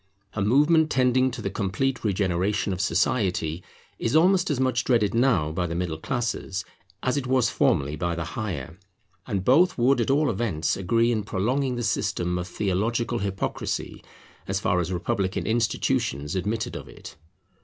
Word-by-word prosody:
A 105 - -2
movement 150 +9 +4
tending 130 -1 +3
to 125 - -7
the - - -2
complete 115 +6 -1
regeneration 95 -1 0
of 90 - -3
society 90 -3 0 0.4
is 115 +5 0
almost 180 +3 +4
as 145 -4 0
much 130 -2 +1
dreaded 115 -5 +2
now 115 - +2
by 90 +2 -1
the 85 - -4
middle 85 -3 -2
classes 100 -3 -3 0.4
as 130 +2 +1
it 135 -2 -2
was 130 -3 +2
formerly 70 +2 +1
by 85 +3 -2
the 85 - -3
higher. 85 - -5 0.5
And 95 -2 -2
both 165 +9 +4
would 125 +1 +3
at 115 - -1
all 145 +1 +3
events 90 -10 -1
agree 115 +6 +2
in 110 -2 0
prolonging 125 +7 -1
the 120 - -3
system 90 -5 -1
of 90 - -4
theological 110 +6 -1
hypocrisy, 95 -1 -3 0.4
as 95 0 -1
far 90 -2 +1
as 90 +1 -2
republican 95 +2 -1
institutions 110 - 0
admitted 110 +4 -2
of - - -7
it. - - -11
105 Hz, 165 wpm, -25 LUFS, 90-125 Hz, 0.5 s, movement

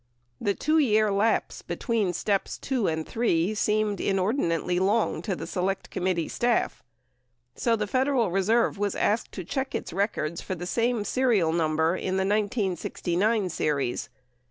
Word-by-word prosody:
The 200 -1 +1
2 310 +2 +2
year 215 -6 +3
lapse 210 +3 +1
be - - -5
tween 225 -7 0
steps 195 +3 -1
(2) 255 -7 -1
and 160 -1 -2
(3) 205 -5 +1
seemed 210 -1 0
inordinately 185 - 0
long 205 +4 +1
to 195 -5 -2
the - - -6
Select 190 +1 -2
Com 180 - -3
mittee 175 -3 +1
staff, 240 0 0 0.7
89 - - -12
so 230 -1 +3
the 215 -1 -1
Federal 255 -2 +1
Reserve 215 +5 +2
w 205 0 0
7 - - -6
as - - +4
asked - - -15
to 185 - -5
check 265 - -3
its - - -4
records 170 -5 -1
for 185 - -4
the 175 +1 -6
same 230 +3 0
serial 205 -8 +2
number 160 0 +1
in 185 0 -2
the 190 - +1
1969 205 -1 0
series. 145 -4 -1
200 Hz, 170 wpm, -26 LUFS, 180-225 Hz, 0.7 s, as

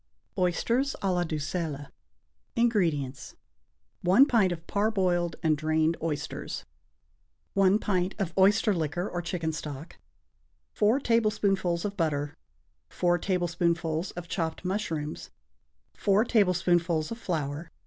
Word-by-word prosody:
=Oysters 230 +9 +1
à 190 -2 +2
la 175 0 +1
D'Uxelles.= 155 -2 -3 0.6
INGREDIENTS. 165 - 0 0.7
1 190 +10 +6
pint 220 -9 +3
of 170 -1 -5
parboiled 185 -5 +1
and 155 -1 +3
drained 155 +2 +1
oysters. 150 -3 -4 0.9
1 195 0 +4
pint 185 -3 -1
of 190 -5 -2
oyster 205 +3 +4
liquor 175 +2 -2
or 175 - -3
chicken 170 -2 -2
stock. 150 0 -7 0.8
4 215 +6 +3
tablespoonfuls 200 -7 +1
of 205 -1 -3
butter. 145 -4 -1 0.5
4 175 -1 +1
tablespoonfuls 170 -2 0
of 175 -1 -7
chopped 165 0 -3
mushrooms. 165 -6 -3 0.6
4 205 +2 +2
tablespoonfuls 175 -6 +2
of 230 - -5
flour. 155 -4 -3
175 Hz, 110 wpm, -28 LUFS, 160-200 Hz, 0.9 s, 1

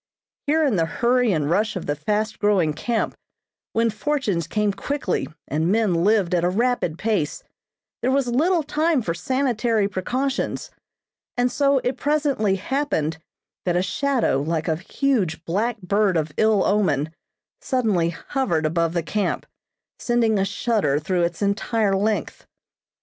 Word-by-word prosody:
Here 315 +2 +3
in 245 -9 +2
the 165 -1 +2
hurry 245 +5 +2
and 155 -5 0
rush 210 +7 +1
of 185 - -4
the 145 - -1
fast 210 +8 -1
growing 195 -7 +2
camp, 225 +9 -1 0.6
when 230 0 +2
fortunes 215 - -1
came 210 -1 0
quickly, 280 -3 -2 0.2
and 160 +5 0
men 215 -3 +2
lived 185 +1 +2
at 175 -1 +2
a 175 - +3
rapid 225 -5 0
pace, 205 -9 -1 0.6
there 250 - +1
was 270 0 +2
little 320 +8 +2
time 305 -2 +1
for 165 - -1
sanitary 230 +1 0
precautions, 255 +8 -2 0.7
and 245 0 +2
so 280 -1 +3
it 250 - -1
presently 285 -9 +1
happened 190 - -1 0.4
that 175 -1 0
a 180 - +2
shadow, 255 - +1
like 160 +2 -2
a 160 -2 +1
huge 190 - -1
black 215 +7 -1
bird 200 -1 +2
of 155 -1 -1
ill 215 -3 +3
omen, 155 -7 +1 0.5
suddenly 215 - +1
hovered 170 - -1
above 165 +1 +1
the 170 -2 0
camp, 205 +5 -1 0.5
sending 230 -3 +2
a 195 - +2
shudder 205 -8 0
through 175 +4 0
its 170 +3 -1
entire 200 0 +1
length. 205 -4 -1
210 Hz, 150 wpm, -23 LUFS, 170-245 Hz, 0.7 s, Here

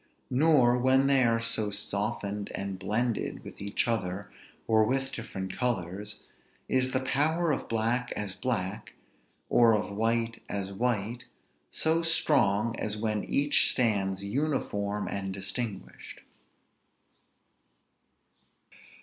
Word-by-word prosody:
Nor, 130 -3 +4
when 130 +2 +4
they 135 -1 +5
are 115 -1 +3
so 115 -2 0
softened 100 0 -2
and 100 -1 -4
blended 110 +5 -1
with - - -10
each 100 +3 -1
other, 100 -3 -2 0.3
or 110 -1 +4
with 135 +3 0
different 95 -5 -6
colors, 105 -3 -2 0.4
is 130 0 +2
the 130 - 0
power 155 +5 +1
of 140 - -3
black 115 +2 0
as 105 -3 -2
black, 105 -4 -3 0.5
or 115 -2 +5
of 105 -1 -3
white 115 +1 0
as 100 -1 -3
white, 120 +2 -1 0.4
so 160 +1 +1
strong 120 -9 +2
as 105 0 -1
when 105 -1 -1
each 145 +1 +4
stands 100 -5 +1
uniform 105 -4 -1
and 95 -1 -3
distinguished. 100 +1 -5
115 Hz, 115 wpm, -29 LUFS, 100-125 Hz, 0.5 s, they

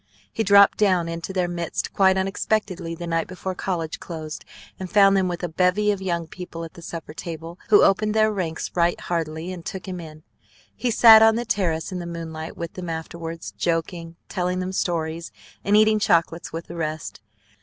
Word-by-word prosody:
He - - -1
dropped 200 -1 +6
down 185 -5 +3
into 165 +2 -5
their 185 -2 0
midst 170 -1 -3
quite 190 -1 +4
unexpectedly 190 -3 -1
the 175 +1 -6
night 165 -1 -1
before 185 +1 -5
college 175 -4 -3
closed, 160 -3 -7 0.4
and 185 -1 -5
found 195 -1 +5
them 190 -1 +2
with 175 0 -4
a - - 0
bevy 180 +5 +2
of 200 -2 -3
young 170 -3 -1
people 170 0 -8
at 165 - -9
the 170 - -12
supper 165 -2 -7
table, 165 +1 -7
who 210 - +7
opened 210 +2 +2
their 215 0 +4
ranks 170 -5 -3
right 175 0 +1
heartily, 165 0 -3
and 175 -2 -9
took 190 +1 -6
him 185 -1 -5
in. 155 -2 -11 0.5
He 250 - -1
sat 225 -1 +8
on 220 0 +6
the 240 +1 -2
terrace 175 -6 -1
in 185 - -4
the 175 - -6
moonlight 165 -1 -6
with 170 -1 -5
them 180 -2 -6
afterwards, 165 0 -6
joking, 165 0 -2
telling 180 -1 -1
them 185 0 -3
stories, 165 -2 -2 0.3
and 205 +1 +4
eating 215 0 +4
chocolates 170 -3 +1
with 165 +1 -5
the 170 - -9
rest. 155 -8 -4
175 Hz, 195 wpm, -23 LUFS, 165-190 Hz, 0.5 s, sat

